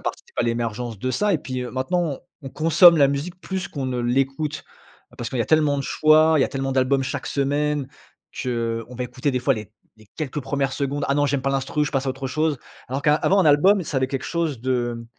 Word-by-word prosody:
participe - - -6
à - - +3
l'émergence 115 -1 -2
de 130 +5 -2
ça. 210 -1 +1
Et 165 - +2
puis, 130 -2 -5
heu, 125 - -6
maintenant, 145 +3 -1 0.2
on 135 - -6
consomme 165 +4 +6
la 140 -2 +6
musique 155 +7 -4
plus 190 -1 -4
qu'on 135 -3 -4
ne 125 -1 -2
l'écoute, 135 +5 -1 0.5
parce 120 -1 -4
qu'il 130 - -3
y 115 - +3
a - - -6
tellement 150 -2 +3
de - - -2
choix. 155 +2 +4
Il - - +3
y - - +5
a - - -2
tellement 135 0 -3
d'albums 135 +1 +2
chaque 135 +1 -4
semaine. 145 0 0 0.6
Qu'on 115 -1 -3
va 125 - -2
écouter, 125 +3 -2
des 130 - 0
fois, 135 +1 +2
les 110 -1 -8 0.3
les 110 -1 -19
quelques 150 -1 -3
1res 135 0 -1
secondes: 140 +1 -2
«Ah 140 - +2
non, 145 0 +2
j'aime 140 -1 0
pas 135 - 0
l'instru, 135 +2 0
je - - -5
passe 135 0 -1
à - - 0
autre 135 +1 -5
chose». 155 0 0 0.3
Alors 135 +2 -2
qu'a 150 +1 +3
avant 195 +5 +2
un 185 - +4
album, 185 +8 +5
ça 150 - -4
avait 130 0 0
quelque 135 -2 -4
chose 160 -8 -2
de 120 -2 -2
135 Hz, 240 wpm, -23 LUFS, 130-150 Hz, 0.6 s, consomme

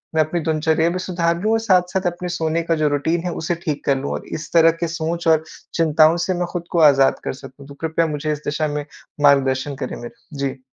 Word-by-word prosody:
मैं 160 - +4
अपनी 155 +3 -3
दिनचर्या 160 +1 +1
भी 180 +2 -3
सुधार 170 -2 -1
लूँ 215 +2 +1
और 225 - +2
साथ-साथ 185 -3 +1
अपने 180 +1 -6
सोने 165 -1 -1
का 165 0 +1
जो 155 -1 +1
रूटीन 160 +4 0
है 180 - -2
उसे 165 +2 -1
ठीक 150 -3 -2
कर 140 -1 +2
लूँ 135 +2 -4
और - - -5
इस 155 - -10
तरह 165 -1 +6
की 170 - +1
सोच 165 +1 -3
और 160 -1 +4 0.3
चिंताओं 160 0 +4
से 190 - 0
मैं 175 - 0
खुद 175 -2 -4
को 170 - +1
आज़ाद 135 -1 +3
कर - - -3
सकूँ। 135 +1 -12
तो 140 - -11
कृपया 165 +1 0
मुझे 150 0 -2
इस 150 - -2
दिशा 155 +1 -1
में 145 0 -3 0.4
मार्गदर्शन 140 0 +3
करें 130 -2 -5
मेरा। 120 +5 -11
जी। 135 -1 -3
160 Hz, 235 wpm, -20 LUFS, 145-170 Hz, 0.4 s, तरह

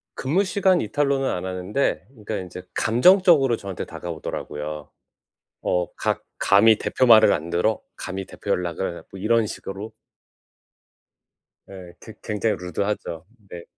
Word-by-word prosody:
근무시간 185 +5 +2
이탈로는 140 +3 0
안 90 - -3
하는데 95 +4 -1
그니까 110 -3 -6
인제 90 -2 -7
감정적으로 145 - +4
저한테 95 -3 -6
다가오더라고요. 75 -2 -6 0.8
어 90 -1 +1
가 - - -1 0.2
"감히 110 +2 +5
대표 130 - +1
말을 110 -3 +7
안 80 +1 -2
들어 90 +5 +1 0.2
감히 95 0 -5
대표 100 - -8
연락을" 90 -1 -2
뭐 95 - -9
이런 115 +2 +2
식으로. 100 +2 -7 1.8
예. 90 -3 -11
괴 110 - -11
굉장히 105 0 -1
루드하죠. 90 -1 -4 0.2
네. 85 -1 -8
100 Hz, 285 characters per minute, -23 LUFS, 90-115 Hz, 1.8 s, 말을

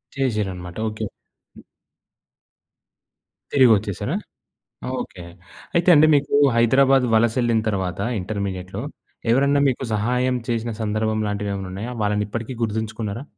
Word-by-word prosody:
చేసారన్నమాట. 95 -9 -2
ఓకే. 110 0 -5 0.5
హ్మ్. - - -14 1.9
తిరిగొచ్చేసారా! 110 -7 +3 0.9
ఓకే. 90 - -8 0.5
అయితే 170 +1 +2
అండి, 155 +1 +7
మీకు 140 0 -1 0.2
హైదరాబాద్ 130 +3 +4
వలస 115 0 +3
యెళ్ళిన 115 -2 +2
తర్వాత 95 -1 -3 0.2
ఇంటర్మీడియేట్‌లో 100 0 -4 0.5
ఎవరన్నా 140 +3 +3
మీకు 130 +1 -1
సహాయం 125 +4 +1
చేసిన 115 0 -1
సందర్భం 110 +1 0
లాంటివేమన్నా 100 -2 -3
ఉన్నాయా? 110 +6 -5
వాళ్ళని 105 0 +1
ఇప్పటికీ 115 +4 -5
గుర్తుంచుకున్నారా? 110 +2 -3
110 Hz, 105 wpm, -22 LUFS, 100-125 Hz, 1.9 s, అండి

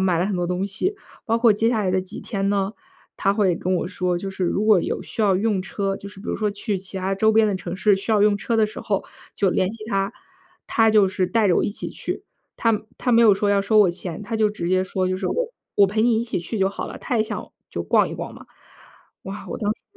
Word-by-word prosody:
买 180 -3 +2
了 - - +2
很 200 -2 -1
多 175 0 -1
东 180 +2 -1
西。 285 - -2 0.3
包 230 0 +1
括 230 -1 +5
接 225 +3 +1
下 230 -2 +1
来 190 -3 0
的 185 0 +2
几 185 - -8
天 195 -1 -2
呢， 200 +1 0 0.4
她 195 - +2
会 190 -5 +2
跟 185 +1 -1
我 175 - -1
说， 180 -2 -1
就 195 +3 -4
是 190 -1 -2
如 200 +4 0
果 215 -4 +5
有 - - -3
需 - - -6
要 200 -3 +4
用 205 0 +1
车， 195 +1 -2
就 200 - -9
是 195 -1 -12
比 - - -11
如 - - -1
说 215 -1 0
去 205 0 -3
其 190 +1 -7
他 190 +1 -1
周 220 +3 +3
边 220 0 +5
的 195 - 0
城 175 -1 -5
市 205 0 +3
需 210 +3 -2
要 205 -1 +4
用 210 -1 +4
车 225 +3 -1
的 220 - +4
时 215 0 -5
候， 200 -2 -1 0.3
就 195 -2 +2
联 185 +1 +1
系 220 -1 -9
她， 195 0 -1 0.6
她 225 -1 +4
就 210 -3 +5
是 190 -1 0
带 220 +1 +2
着 175 - +4
我 - - +2
一 - - -1
起 - - -5
去。 - - -5 0.3
她 225 -2 +2 0.2
她 250 - -1
没 230 0 +5
有 215 -4 +7
说 205 +1 0
要 200 -1 +3
收 215 +2 +3
我 195 -4 +5
钱， 175 +1 -5
她 225 +2 -3
就 215 -1 +3
直 175 -5 -4
接 185 0 +2
说 185 -1 -1
就 185 - -1
是： 190 0 -3
“我 - - -1 0.2
我 200 - +6
陪 215 +3 0
你 235 -1 +3
一 - - -1
起 235 - -2
去 175 +6 -5
就 190 -1 +2
好 200 - -5
了。” - - -8
她 245 - -1
也 220 - +2
想， - - -6 0.2
就 - - -4
逛 - - +3
一 - - -6
逛 - - -6
嘛。 - - -13 0.8
哇， 195 +2 -7
我 - - -4
当 210 -1 0
时， - - -19
200 Hz, 300 characters per minute, -23 LUFS, 190-220 Hz, 0.8 s, 有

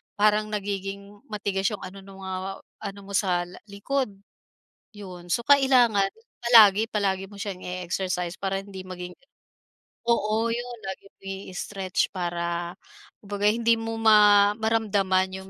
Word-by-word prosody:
parang 210 +1 +3
nagiging 200 -1 -5
matigas 200 -2 -1
'yong 210 - -3
ano 190 +1 -8
nung, 195 -1 -12
ah, 190 +1 -4 0.2
ano 200 0 -6
mo 200 - -11
sa 180 -3 +1
la - - -12
likod 255 +7 -1 0.9
'yon. 180 -4 -10
So, 235 - +1
kailangan 255 -8 +5 0.3
palagi 225 -3 +7
palagi 195 -2 0
mo 205 - -14
siyang 200 -3 -5
i-exercise 180 0 -3
para 195 0 -1
hindi 195 -2 -9
maging 180 -1 -7 0.9
oo, 225 -1 +2
'yon 240 +1 -4
lagi 190 +1 -6
mo - - -73 0.3
i-stretch 190 0 -2
para 170 -1 -2 0.5
kumbaga 205 0 -1
hindi 230 +1 +3
mo 225 0 -4
ma 210 -2 +6
maramdaman 200 -4 +1
yung 190 - -14
200 Hz, 135 wpm, -26 LUFS, 190-215 Hz, 0.9 s, palagi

